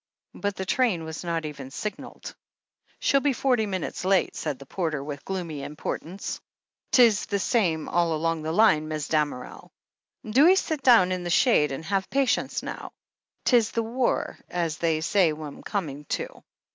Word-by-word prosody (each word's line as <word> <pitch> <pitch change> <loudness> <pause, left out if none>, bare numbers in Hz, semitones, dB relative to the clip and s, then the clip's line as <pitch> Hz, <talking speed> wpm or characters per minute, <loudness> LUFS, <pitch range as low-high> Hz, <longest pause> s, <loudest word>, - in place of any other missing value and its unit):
But 205 -1 -3
the 190 - -4
train 210 -6 +1
was 160 +1 -6
not 165 -2 -2
even 140 -3 -7
signalled. 205 +9 -6 0.7
"She'll 275 - +3
be 280 0 +1
forty 245 -3 +1
minutes 185 -2 -4
late," 190 0 +2
said 150 -4 -3
the 140 - -12
porter 155 -2 -2
with 145 -1 -6
gloomy 170 -6 -4
importance. 155 +5 -5 0.2
" - - -57
'Tis 230 -5 +5
the 200 - 0
same 180 -7 +1
all 170 -1 +1
along 165 +1 -1
the 155 +1 -3
line. 160 -5 +4
Mis' 155 -2 -3
Damerel. 150 -5 -2 0.6
Do 260 +9 +5
'ee 370 - +7
sit 315 -6 -1
down 230 -9 +6
in 185 -1 -2
the 175 - -3
shade 165 - +4
and 135 +4 -5
have 195 +1 -1
patience, 270 -1 0
now. - - -7 0.5
'Tis 235 -4 +4
this 230 - -1
war, 240 +3 -1
as 165 -3 -2
they 160 -2 +1
say 175 -1 +3
we'm 150 -2 -8
coming 150 -8 -4
to." - - -4
175 Hz, 170 wpm, -26 LUFS, 155-220 Hz, 0.7 s, ee